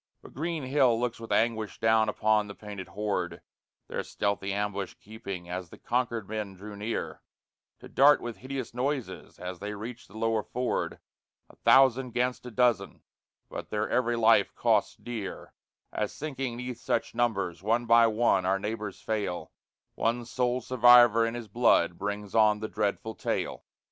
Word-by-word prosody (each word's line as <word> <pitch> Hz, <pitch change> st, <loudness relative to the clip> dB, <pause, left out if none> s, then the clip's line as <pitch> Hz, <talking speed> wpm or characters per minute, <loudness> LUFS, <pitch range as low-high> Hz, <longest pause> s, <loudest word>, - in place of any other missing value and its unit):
But -, -, -13 dB
Green 160 Hz, +2 st, -3 dB
Hill 130 Hz, -3 st, +3 dB
looks 120 Hz, -1 st, -2 dB
with 115 Hz, -, -9 dB
anguish 110 Hz, -2 st, 0 dB
down 110 Hz, -1 st, +3 dB
upon 105 Hz, 0 st, +2 dB
the 100 Hz, -, -9 dB
painted 100 Hz, -3 st, -8 dB
horde 100 Hz, +2 st, -3 dB, 0.5 s
Their -, -, -3 dB
stealthy 100 Hz, -1 st, -2 dB
ambush 100 Hz, -1 st, -3 dB
keeping 100 Hz, -4 st, -8 dB
as 90 Hz, 0 st, -5 dB
the -, -, -13 dB
Concord 120 Hz, -4 st, -1 dB
men 105 Hz, -2 st, -4 dB
draw 105 Hz, +3 st, -9 dB
near, 105 Hz, +3 st, -4 dB, 0.6 s
To -, -, -10 dB
dart 145 Hz, 0 st, +5 dB
with 120 Hz, -3 st, -6 dB
hideous 130 Hz, +2 st, -5 dB
noises 130 Hz, +1 st, -3 dB
as 90 Hz, 0 st, -6 dB
they 105 Hz, +1 st, -5 dB
reach 115 Hz, +3 st, -8 dB
the 110 Hz, -, -13 dB
lower 115 Hz, -1 st, +1 dB
ford, 125 Hz, +3 st, -2 dB, 0.5 s
A -, -, -22 dB
thousand 130 Hz, -2 st, +4 dB
'gainst 125 Hz, 0 st, -1 dB
a -, -, -5 dB
dozen; 120 Hz, 0 st, +1 dB, 0.4 s
but -, -, -7 dB
their 105 Hz, 0 st, -1 dB
every 120 Hz, -1 st, +2 dB
life 115 Hz, -3 st, +4 dB
costs -, -, +2 dB
dear 115 Hz, -5 st, -7 dB, 0.4 s
As, -, -, -1 dB
sinking 135 Hz, -5 st, -4 dB
'neath 125 Hz, -1 st, -5 dB
such 115 Hz, -, -1 dB
numbers, 100 Hz, -8 st, -1 dB
one 115 Hz, +4 st, +1 dB
by 115 Hz, 0 st, +6 dB
one 110 Hz, -4 st, +2 dB
our 95 Hz, +1 st, +2 dB
neighbors 105 Hz, 0 st, -5 dB
fail: 105 Hz, -5 st, -3 dB, 0.4 s
One 120 Hz, +1 st, -1 dB
sole 125 Hz, +1 st, 0 dB
survivor 120 Hz, -2 st, +6 dB
in 115 Hz, -, -4 dB
his 120 Hz, -2 st, -6 dB
blood 100 Hz, -6 st, +3 dB
brings 105 Hz, 0 st, -4 dB
on 105 Hz, -1 st, +4 dB
the 110 Hz, -, -3 dB
dreadful 105 Hz, +1 st, -2 dB
tale. -, -, -3 dB
110 Hz, 165 wpm, -28 LUFS, 105-120 Hz, 0.6 s, by